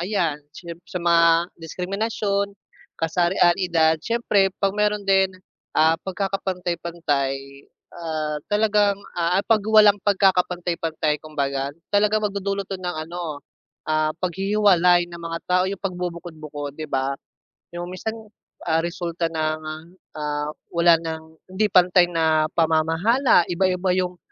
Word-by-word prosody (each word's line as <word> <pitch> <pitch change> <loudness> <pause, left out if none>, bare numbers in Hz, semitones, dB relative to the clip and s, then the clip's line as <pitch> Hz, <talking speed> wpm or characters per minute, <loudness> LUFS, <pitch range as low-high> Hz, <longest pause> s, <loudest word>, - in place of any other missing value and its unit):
ayan 170 -6 -1
siyemp 170 +2 -10
sa 180 - -4
mga 170 0 +4
diskriminasyon, 200 +4 -2 0.5
kasarian, 175 +1 +2
edad, 165 -4 +2
siyempre 210 -4 +1
'pag 195 0 0
meron 210 -1 0
din, 190 -1 +4 0.5
ah, 160 +1 +5
pagkakapantay-pantay, 175 -7 -2 0.6
ah, 155 -3 -3
talagang, 205 -1 +2 0.2
ah, 175 +2 +1
'pag 215 -3 +3
walang 210 -2 +6
pagkakapantay-pantay 175 -6 +1
kumbaga, 140 -3 -2 0.2
talagang 210 +1 +3
magdudulot 200 -1 -3
'to 195 - -5
ng 180 -2 -5
ano, 170 -3 -5 0.5
ah, 155 0 +1
paghihiwalay 185 -1 +3
ng 170 0 -10
mga 165 0 -4
tao, 180 0 +3
yung 200 - -6
pagbubukod-bukod 170 -6 -5
'di 155 -2 -7
ba? 135 +1 0 0.6
Yung 175 0 -5
minsan, 220 +5 -5 0.5
ah, 160 0 +2
resulta 170 -1 -3
ng, 155 -1 -1 0.6
ah, 150 0 -2 0.2
wala 170 0 +5
ng 160 -1 -5 0.3
hindi 210 +2 +1
pantay 180 -1 +5
na 160 -2 +2
pamamahala, 165 - +3
iba-iba 180 +1 +1
yung 180 -1 -1
175 Hz, 120 wpm, -23 LUFS, 160-195 Hz, 0.6 s, walang